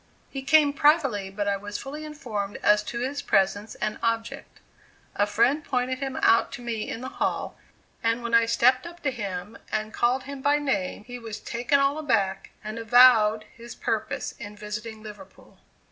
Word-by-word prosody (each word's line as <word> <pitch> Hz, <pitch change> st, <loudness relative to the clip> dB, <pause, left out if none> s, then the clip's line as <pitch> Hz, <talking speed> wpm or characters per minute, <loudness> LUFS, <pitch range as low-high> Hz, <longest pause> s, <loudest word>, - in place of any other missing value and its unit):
He 270 Hz, -, -5 dB
came 285 Hz, +1 st, +4 dB
privately, 275 Hz, -, +2 dB
but 205 Hz, +1 st, -3 dB
I 200 Hz, 0 st, +1 dB
was 205 Hz, +1 st, -6 dB
fully 295 Hz, +3 st, -7 dB
informed 220 Hz, -10 st, -5 dB
as 210 Hz, 0 st, +5 dB
to 235 Hz, +3 st, -4 dB
his 280 Hz, +3 st, -2 dB
presence 200 Hz, +1 st, +1 dB
and 215 Hz, 0 st, -3 dB
object. 230 Hz, 0 st, -3 dB, 0.6 s
A 205 Hz, -, +2 dB
friend 235 Hz, +9 st, +2 dB
pointed 255 Hz, 0 st, -1 dB
him 270 Hz, -1 st, -4 dB
out 230 Hz, -, +4 dB
to 260 Hz, -3 st, -7 dB
me 230 Hz, -3 st, -3 dB
in 230 Hz, -, -5 dB
the 260 Hz, -, -5 dB
hall, -, -, -1 dB, 0.5 s
and 230 Hz, +1 st, 0 dB
when 235 Hz, 0 st, -4 dB
I 230 Hz, 0 st, +5 dB
stepped 255 Hz, +4 st, +3 dB
up 340 Hz, 0 st, -12 dB
to 275 Hz, -, +1 dB
him, 200 Hz, -4 st, -6 dB
and 215 Hz, 0 st, -2 dB
called 250 Hz, +2 st, +1 dB
him 280 Hz, 0 st, -8 dB
by 285 Hz, +2 st, +3 dB
name, 205 Hz, -10 st, -2 dB
he 245 Hz, +2 st, -8 dB
was 220 Hz, -2 st, -7 dB
"taken 245 Hz, +4 st, 0 dB
all 275 Hz, +2 st, +1 dB
aback," 195 Hz, -10 st, 0 dB
and 215 Hz, +2 st, -5 dB
avowed 225 Hz, -2 st, +6 dB
his 235 Hz, 0 st, -11 dB
purpose -, -, -2 dB
in 210 Hz, -2 st, -8 dB
visiting 215 Hz, +1 st, -7 dB
Liverpool. 215 Hz, +7 st, -13 dB
235 Hz, 180 wpm, -26 LUFS, 210-270 Hz, 0.6 s, avowed